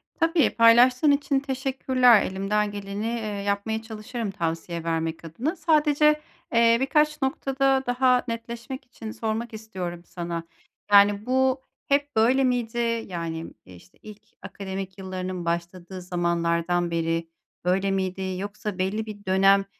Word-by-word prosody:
Tabii, 330 -1 +3
paylaştığın 245 +5 +6
için 280 -1 +1
teşekkürler. 260 -4 +3
Elimden 205 +2 -1
geleni, 200 +1 -5
eee, 230 -1 -2 0.2
yapmaya 205 +2 -1
çalışırım 220 -1 -5
tavsiye 165 -1 -3
vermek 165 0 -2
adına. 250 - -3
Sadece, 300 -1 +3 0.3
eee, 230 0 +5
birkaç 300 +2 +2
noktada 270 0 +1
daha 250 0 +3
netleşmek 235 +3 -6
için 225 -3 -9
sormak 225 +1 -3
istiyorum 185 -6 -6
sana. 170 -1 -5 0.5
Yani, 205 +1 +6
bu 260 +1 +2 0.3
hep 285 0 +1
böyle 245 +5 +4
miydi? 240 -2 0 0.3
Yani, 165 -2 -4 0.2
işte 90 -1 -16
ilk 215 -1 -12 0.2
akademik 190 -1 -6
yıllarının 185 -2 -5
başladığı 175 +2 -4
zamanlardan 170 0 0
beri 165 0 -1 0.4
böyle 190 +2 +1
miydi 190 -1 -2
yoksa 205 0 -5
belli 195 +4 -1
bir 205 -2 -10
dönem, 195 +1 +4
210 Hz, 125 wpm, -25 LUFS, 185-255 Hz, 0.5 s, paylaştığın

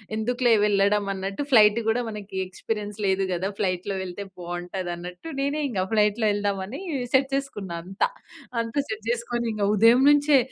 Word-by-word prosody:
ఎందుకులే 240 +2 +2
వెళ్ళడం 205 0 +3
అన్నట్టు 195 +6 -4
ఫ్లైట్ 215 -2 +7
కూడా 235 +2 +2
మనకు 210 -3 -8
ఎక్స్‌పీరియన్స్ 210 +2 -5
లేదు 195 0 +2
కదా! 180 +2 -1
ఫ్లైట్‌లో 185 0 -1
వెళ్తే 190 +2 -5 0.2
బాగుంటది 175 +1 -5
అన్నట్టు 180 - -8
నేనే 280 +2 0
ఇంకా 190 -5 -1
ఫ్లైట్‌లో 210 +1 +2
వెళ్దాం 205 -1 0
అని 255 +9 -7 0.3
సెట్ 265 +1 +4
చేసుకున్న 210 -10 -4
అంత. 190 +2 -3 0.6
అంతా 230 +5 -1
సెట్ 220 0 -6
చేసుకొని 235 0 -1
ఇంకా 205 -1 0
ఉదయం 230 +5 +6
నుంచే 290 -1 +5
210 Hz, 155 wpm, -25 LUFS, 195-235 Hz, 0.6 s, ఫ్లైట్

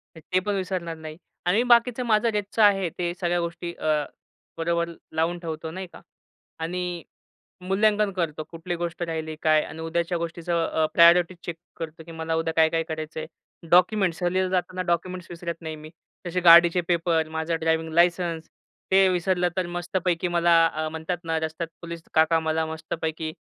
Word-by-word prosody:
तर 160 - -11
ते 185 - +4
पण 205 - +1
विसरणार 180 -4 -3
नाही. 155 -1 -9 0.3
आणि 200 +7 +3
बाकीचं 240 +1 +4
माझं 220 0 +3
रोजचं 210 +1 -1
आहे. 195 -4 +4
ते 175 -1 -1
सगळ्या 175 -1 +1
गोष्टी 170 0 -4
अ, - - -11 0.7
बरोबर 170 +1 0 0.3
लावून 165 +2 +1
ठेवतो, 160 -2 -5
नाही 185 +3 -6
का. - - -12 0.6
आणि 175 +1 -3 0.6
मूल्यांकन 205 +3 +2
करतो 165 -4 -2
कुठली 170 +1 -5
गोष्ट 170 0 -4
राहिली 160 -2 -3
काय 155 -1 +4
आणि 160 - -9
उद्याच्या 170 +2 -1
गोष्टीचं 170 0 -2
अ, 160 -1 +1
प्रायोरिटी 170 +1 +6
चेक 170 - -5 0.2
करतो 160 -1 -7
की 165 - -9
मला 160 0 -3
उद्या 165 0 -1
काय-काय 160 0 +3
करायचंय. 155 0 -5 0.4
डॉक्युमेंट्स, 180 -1 +4
सहलीला 185 +2 +1
जाताना 185 0 -1
डॉक्युमेंट्स 180 +1 -3
विसरत 170 -1 -6
नाही 160 -1 -6
मी. 155 +1 -11 0.4
तसे 180 +1 -1
गाडीचे 170 0 +7
पेपर, 165 -2 +1
माझा 160 +1 -2
ड्रायव्हिंग 160 0 0
लायसन्स, 170 -1 +2 0.4
ते 190 0 +6
विसरलं 180 0 +1
तर 185 -2 0
मस्तपैकी 175 0 -1
मला 165 -2 +3
म्हणतात 160 +3 -4
ना, 165 -1 0
रस्त्यात 160 +1 -4
पोलीस 170 -1 -7
काका, 160 +1 +4
मला 160 0 0
मस्तपैकी 160 0 -4
170 Hz, 160 wpm, -25 LUFS, 160-180 Hz, 0.7 s, गाडीचे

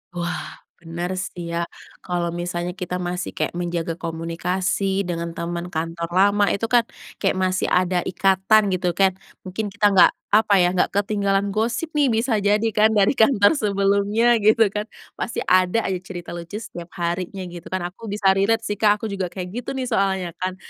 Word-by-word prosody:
Wah, 175 0 -4 0.2
bener 170 +2 -5
sih 175 -2 -6
ya, 170 0 -1 0.3
kalau 175 -1 -2
misalnya 175 0 -3
kita 180 -1 -5
masih 180 0 -4
kayak - - -1
menjaga 170 -1 -2
komunikasi 180 +4 -1
dengan 170 -1 -4
teman 170 +1 -4
kantor 165 0 -3
lama, 200 +1 +4
itu 200 - -1
kan 235 -2 +4 0.3
kayak 195 -2 +1
masih 185 0 0
ada 180 0 +2
ikatan, 195 +2 +3
gitu 180 -1 -1
kan. 195 -1 +4 0.3
Mungkin 195 +3 -4
kita 205 +1 +2
nggak, 190 -2 +6 0.2
apa 215 0 +4
ya, 175 - +3
nggak 185 - +1
ketinggalan 200 -1 +1
gosip 235 +10 -1
nih, 295 -2 +2
bisa 225 -1 +1
jadi 205 +2 +2
kan 215 +1 +3
dari 200 -1 +4
kantor 220 -3 +5
sebelumnya, 205 +3 +2
gitu 215 0 +4
kan, 210 +1 -3 0.3
pasti - - -3
ada 185 +4 +3
aja 185 -2 -2
cerita 175 -1 -8
lucu 170 +3 -7
setiap 175 -6 -7
harinya, 175 +2 -3
gitu 175 -2 -9
kan. 185 -1 -3
Aku 225 +4 -11
bisa 200 -1 +2
relate 220 +4 +2
sih, 205 -1 -3
Kak, 210 0 +3
aku - - 0
juga 190 -2 -2
kayak 180 +5 -6
gitu - - -7
nih, 255 -2 -3
soalnya 190 -4 0
kan. 185 0 -2
190 Hz, 175 wpm, -22 LUFS, 175-210 Hz, 0.3 s, nggak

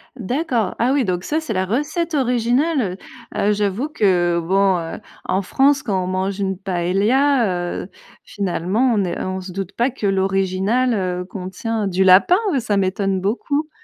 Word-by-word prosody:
D'accord, 245 - -1
ah 240 +3 +2
oui, 275 -4 +2
donc 180 -2 -2
ça, 305 +9 -1
c'est 315 -9 -4
la 190 0 0
recette 310 - -1
originale, 250 - +1 0.4
heu - - -2
heu, 205 - +2
j'avoue 205 +6 -1
que 175 - +2
bon, 185 -1 +1 0.4
en 190 - 0
France, 275 +6 +2
quand 190 -4 -1
on - - -4
mange 190 +2 -2
une 190 -2 -1
paella, 195 +2 +1
heu, 190 - -11 0.3
finalement, 200 +5 0
on 200 - +2
est 175 - -3
on 185 0 -3
se 185 0 -8
doute 195 0 -5
pas 240 +3 +1
que 220 -5 -3
l'originale, 195 +5 +1
heu, 180 -2 -2
contient 200 +4 -4
du 190 0 +1
lapin, 190 - +6 0.2
ça 210 -4 -1
m'étonne 195 0 0
beaucoup. 285 +9 -1
195 Hz, 165 wpm, -20 LUFS, 185-245 Hz, 0.4 s, lapin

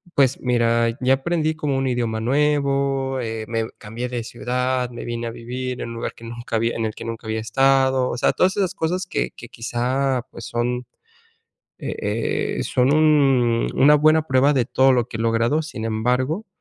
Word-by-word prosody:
pues 135 -2 +3
mira, 115 -1 +1
ya 130 +1 +4
aprendí 155 +2 -1
como 145 -3 -1
un 135 0 0
idioma 120 -3 -1
nuevo, 140 0 +1
eh, 110 -1 -4
me 115 0 -2
cambié 120 +3 -5
de 120 -2 -3
ciudad, 125 +1 -1
me 120 - -7
vine 120 0 -3
a - - -4
vivir 125 +2 -5
en - - -4
un 115 - -7
lugar 115 - -4
que 115 - -12
nunca 120 0 -4
había 115 +1 0
en 115 - -1
el 110 - -3
que - - -8
nunca 115 -1 -6
había 110 0 -1
estado, 130 +2 +2
o 120 - -3
sea, - - +2
todas 190 +2 +2
esas 190 -1 0
cosas 180 +2 -1
que - - -2
que 120 - -10
quizá, 125 +2 -1
pues - - -10
son, 125 +1 -2 0.9
eh, - - -2
son 130 +2 +2
un 135 -7 +3
una 150 +2 +6
buena 155 +2 +4
prueba 130 +2 +4
de 125 - +2
todo 130 0 +4
lo 120 -2 +1
que 110 - -6
he - - -4
logrado, 115 +6 +2
sin 125 -8 -6
embargo, 125 - 0
125 Hz, 190 wpm, -22 LUFS, 115-135 Hz, 0.9 s, una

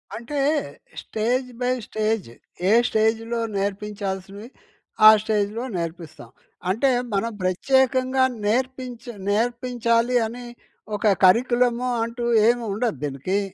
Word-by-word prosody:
అంటే 240 +6 -5 0.6
stage 245 +4 -1
by 250 0 +1 0.2
stage 215 - -1 0.4
ఏ - - +4 0.2
స్టేజ్‌లో 225 +2 0 0.2
నేర్పించాల్సినవి, 200 +1 -4 0.6
ఆ - - +13
స్టేజ్‌లో 215 +1 -1
నేర్పిస్తాం. 165 -2 -7 0.4
అంటే 230 +9 +2 0.2
మనం 215 +4 0
ప్రత్యేకంగా 260 +6 +2 0.2
నేర్పించి 250 +1 -2 0.2
నేర్పించాలి 235 +2 0
అని 245 +2 -9 0.5
ఒక 210 +1 0 0.2
కరిక్యులమ్ 240 +4 +3 0.2
అంటూ 235 +1 -5 0.2
ఏమి 240 0 +2
ఉండదు 225 +1 -1
దీనికి. 145 +8 -1
230 Hz, 100 wpm, -23 LUFS, 205-245 Hz, 0.6 s, ఆ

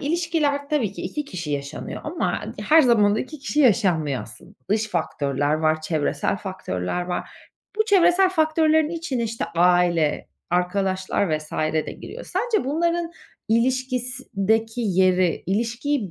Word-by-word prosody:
ilişkiler 300 -3 0
tabii 255 -11 0
ki - - -8
2 300 -1 -3
kişi 175 - -6
yaşanıyor 140 +1 -5
ama 325 +3 -2 0.2
her 315 +1 +5
zaman 210 -5 +4
da - - 0
2 305 +3 -7
kişi 295 +2 -1
yaşanmıyor 180 - +2
aslında. 175 - -14 0.2
Dış 215 +1 +1
faktörler 145 -4 -1
var, 155 0 +1
çevresel 155 +1 -1
faktörler 180 - -4
var. 180 0 -4 0.5
Bu 435 - +2
çevresel 375 -2 +4
faktörlerin 315 -2 +3
içine, 325 -8 -3
işte 230 0 -2
aile, 175 -3 +3 0.2
arkadaşlar 185 -1 0
vs. 155 0 -13
de 155 0 -1
giriyor. - - -9
Sence 430 - -1
bunların 335 +4 0 0.4
ilişkideki 245 -2 0
yeri 185 -4 +2
ilişkiyi 230 - -1
220 Hz, 130 wpm, -23 LUFS, 175-295 Hz, 0.5 s, her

